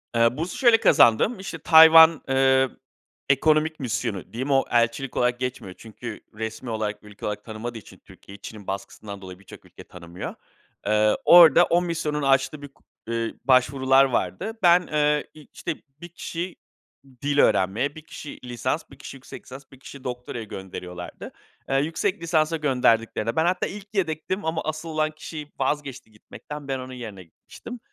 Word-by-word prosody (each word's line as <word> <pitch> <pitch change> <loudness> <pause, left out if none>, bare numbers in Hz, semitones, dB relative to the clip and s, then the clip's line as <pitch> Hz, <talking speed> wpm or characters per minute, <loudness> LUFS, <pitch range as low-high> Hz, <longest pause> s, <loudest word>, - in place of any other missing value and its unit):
Eee, 115 +3 +3
bursu 170 +3 -4
şöyle 235 -3 +5
kazandım. 190 - +4
İşte, 190 -3 -6
Tayvan, 160 0 +8
eee, 130 0 +3 0.6
Ekonomik 155 +3 +2
Misyonu 110 -6 -4
diyeyim 130 +4 -3
o 135 0 +3
elçilik 120 +3 0
olarak 125 0 +1
geçmiyor 125 -7 -5
çünkü 110 0 -9
resmî 110 +3 -6
olarak, 110 -2 -3
ülke 105 -1 -11
olarak 105 0 -4
tanımadığı 115 +2 -6
için 105 - -14
Türkiye, 100 +1 -15
Çin'in 105 -1 -11
baskısından 100 +1 -7
dolayı 95 -1 -10
birçok 100 - -15
ülke - - -14
tanımıyor. 85 0 -9 0.5
Eee, 105 0 +2
orada 175 0 +8
o 175 +1 +2
misyonun 155 -4 -2
açtığı 135 +2 +1
bir 145 - -8
k 135 - -29 0.3
eee, 115 -1 -2
başvurular 130 +1 +4
vardı. 190 - -2
Ben, 175 0 +5
eee, 150 -1 +1 0.3
işte, 170 - -4 0.3
1 175 - -9
kişi 175 +1 -6 0.7
dil 145 0 0
öğrenmeye, 115 +11 +2
1 155 - -9
kişi 150 - -10
lisans, 125 +5 -3
1 135 - -14
kişi 135 - -10
yüksek 130 - -12
lisans, 135 +2 -11
1 135 - -16
kişi 135 0 -12
doktoraya 125 -2 -6
gönderiyorlardı. 90 -3 -8 0.4
Eee, 135 - 0
yüksek 165 +4 -2
lisansa 165 -1 +1
gönderdiklerinde 115 -5 +1
ben 160 +1 +2
hatta 180 +1 0
ilk 205 +1 -9
yedektim 180 0 -2
ama 160 0 -1
asıl 155 +1 -5
olan 155 -1 0
kişi 155 -1 -9
vazgeçti 135 -3 -3
gitmekten, 145 +6 -11
ben 135 -1 -2
onun 130 0 -8
yerine 110 -7 -8
gitmiştim. 235 - -12
135 Hz, 160 wpm, -24 LUFS, 115-155 Hz, 0.7 s, Tayvan